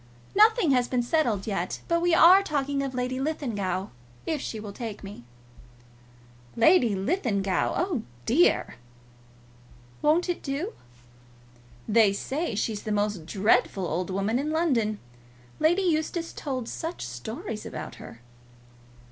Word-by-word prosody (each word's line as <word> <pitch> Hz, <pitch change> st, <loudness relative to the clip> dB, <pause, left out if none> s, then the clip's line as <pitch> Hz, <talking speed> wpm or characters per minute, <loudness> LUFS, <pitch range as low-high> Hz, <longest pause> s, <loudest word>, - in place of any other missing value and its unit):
"Nothing 430 Hz, -, +5 dB
has 250 Hz, -2 st, +3 dB
been 250 Hz, -2 st, 0 dB
settled 240 Hz, -7 st, 0 dB
yet; 195 Hz, -4 st, -3 dB
but 335 Hz, 0 st, +1 dB
we 350 Hz, 0 st, +2 dB
are 365 Hz, +5 st, +8 dB
talking 285 Hz, -5 st, -1 dB
of 270 Hz, -2 st, -4 dB
Lady 250 Hz, +1 st, -2 dB
Linlithgow, 225 Hz, -10 st, -2 dB, 0.4 s
if 310 Hz, -4 st, -2 dB
she 220 Hz, -, -5 dB
will 210 Hz, -1 st, -7 dB
take 220 Hz, -2 st, -6 dB
me." 195 Hz, -11 st, -10 dB, 1.3 s
"Lady 235 Hz, -, +4 dB
Linlithgow! 200 Hz, -, 0 dB
Oh 345 Hz, -, 0 dB, 0.2 s
dear!" 285 Hz, -, +2 dB, 1.2 s
"Won't 315 Hz, +5 st, +3 dB
it 355 Hz, -, -2 dB
do?" 305 Hz, +11 st, -3 dB, 1.1 s
"They 215 Hz, -2 st, +4 dB
say 270 Hz, +5 st, -3 dB
she 220 Hz, +2 st, -1 dB
is 205 Hz, -, -6 dB
the 215 Hz, -, -4 dB
most 205 Hz, -5 st, -1 dB
dreadful 200 Hz, 0 st, +2 dB
old 175 Hz, +3 st, -2 dB
woman 195 Hz, +5 st, 0 dB
in 295 Hz, +2 st, -2 dB
London. 260 Hz, -10 st, +1 dB, 0.6 s
Lady 345 Hz, +5 st, +3 dB
Eustace 335 Hz, 0 st, -1 dB
told 255 Hz, -5 st, -4 dB
such 325 Hz, -, -5 dB
stories 215 Hz, -, -6 dB
about -, -, -7 dB
her." 115 Hz, -, -11 dB
250 Hz, 130 wpm, -26 LUFS, 205-320 Hz, 1.3 s, are